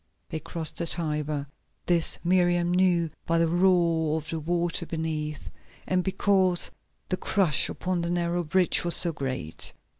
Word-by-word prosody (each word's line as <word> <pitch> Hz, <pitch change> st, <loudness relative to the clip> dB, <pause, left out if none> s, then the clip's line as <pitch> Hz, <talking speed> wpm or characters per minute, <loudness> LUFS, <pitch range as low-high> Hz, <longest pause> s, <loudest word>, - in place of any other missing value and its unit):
They 160 Hz, -, -4 dB
crossed 155 Hz, 0 st, +1 dB
the 170 Hz, -, -2 dB
Tiber. 150 Hz, -3 st, -1 dB, 0.4 s
This 170 Hz, -2 st, +1 dB
Miriam 175 Hz, -1 st, +2 dB
knew 175 Hz, -3 st, +2 dB, 0.2 s
by 165 Hz, -, +1 dB
the 165 Hz, 0 st, +2 dB
roar 170 Hz, -3 st, +2 dB
of 155 Hz, -1 st, -7 dB
the 165 Hz, -, -3 dB
water 170 Hz, +2 st, -1 dB
beneath, 155 Hz, -2 st, -4 dB, 0.4 s
and 185 Hz, -1 st, +1 dB
because 190 Hz, -1 st, +2 dB, 0.4 s
the 185 Hz, -, -1 dB
crush 180 Hz, -9 st, +1 dB
upon 180 Hz, -1 st, -3 dB
the 170 Hz, -, -3 dB
narrow 175 Hz, 0 st, -1 dB
bridge 180 Hz, +3 st, +2 dB
was 175 Hz, -1 st, +2 dB
so 170 Hz, -2 st, +4 dB
great. 130 Hz, -, -5 dB
170 Hz, 150 wpm, -26 LUFS, 160-180 Hz, 0.4 s, so